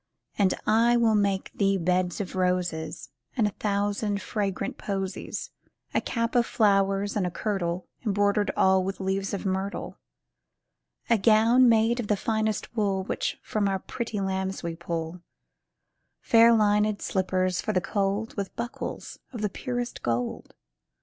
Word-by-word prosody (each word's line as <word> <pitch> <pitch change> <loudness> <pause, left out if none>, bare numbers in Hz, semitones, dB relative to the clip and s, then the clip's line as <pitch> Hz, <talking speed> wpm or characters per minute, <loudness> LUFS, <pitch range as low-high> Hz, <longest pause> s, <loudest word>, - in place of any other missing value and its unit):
And 195 -3 +2
I 230 +2 +4
will 230 -2 +3
make 200 -2 +1
thee 195 -1 +2
beds 180 0 0
of 195 -2 -4
roses 180 -8 -1 0.3
And 225 - +3
a 210 - +1
thousand 205 0 -1
fragrant 200 -3 -3
posies, 195 -2 -4 0.4
A - - +2
cap 230 -1 -2
of 240 -1 +3
flowers, 195 -1 +2
and 195 -4 +1
a - - -1
kirtle 180 -2 -2 0.2
Embroidered 205 -1 +1
all 190 0 +4
with 195 +1 -4
leaves 195 0 -1
of 200 - -4
myrtle. 190 +1 -3 1.1
A 230 -2 +3
gown 230 +4 +5
made 230 +2 +3
of 230 - -2
the 210 - +2
finest 220 +1 -1
wool, 200 -3 +1
Which - - -2
from 210 -2 0
our 195 -1 +1
pretty 225 +2 -4
lambs 190 -1 -2
we 170 -1 -3
pull, 170 0 -4 1.0
Fair 230 0 +6
lined 210 -2 +3
slippers 185 -1 0
for - - -1
the 185 - +2
cold, 200 +3 -1
With 200 -2 -4
buckles 235 +1 -5
of 235 -5 -6
the 210 - +1
purest 245 +4 -4
gold. 120 +1 -3
200 Hz, 150 wpm, -27 LUFS, 190-220 Hz, 1.1 s, Fair